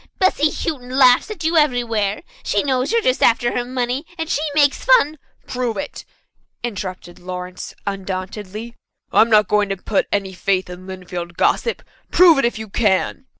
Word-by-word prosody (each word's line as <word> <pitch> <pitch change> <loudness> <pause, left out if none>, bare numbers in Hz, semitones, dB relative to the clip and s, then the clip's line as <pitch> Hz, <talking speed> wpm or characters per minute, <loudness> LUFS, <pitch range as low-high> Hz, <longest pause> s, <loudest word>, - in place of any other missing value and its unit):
"Bessy 340 -6 +3
Houghton 260 -5 -4
laughs 255 +5 +5
at 420 -7 -6
you 325 +1 +2
everywhere. 235 -8 +1 0.2
She 205 - 0
knows 260 +1 0
you're 460 -1 +2
just 255 - +1
after 240 +1 +3
her 245 - 0
money, 250 +2 -2
and 325 -1 -3
she 295 - 0
makes 290 -2 +3
fun 315 - +4
" - - -40
"Prove 245 -3 -3
it," 290 - -6 0.6
interrupted 185 -6 -6
Lawrence 180 0 -7
undauntedly, 200 +3 -5 0.4
"I'm 230 - +5
not 210 -3 +5
going 210 -1 +2
to 195 - -2
put 200 +2 -1
any 195 -2 -1
faith 185 0 -1
in 180 +1 -10
Lynnfield 180 -2 -7
gossip. 470 - +1 0.3
Prove 345 -5 +6
it 275 - +2
if 235 - 0
you 220 0 -6
can." 210 +5 0
235 Hz, 170 wpm, -20 LUFS, 195-275 Hz, 0.6 s, Prove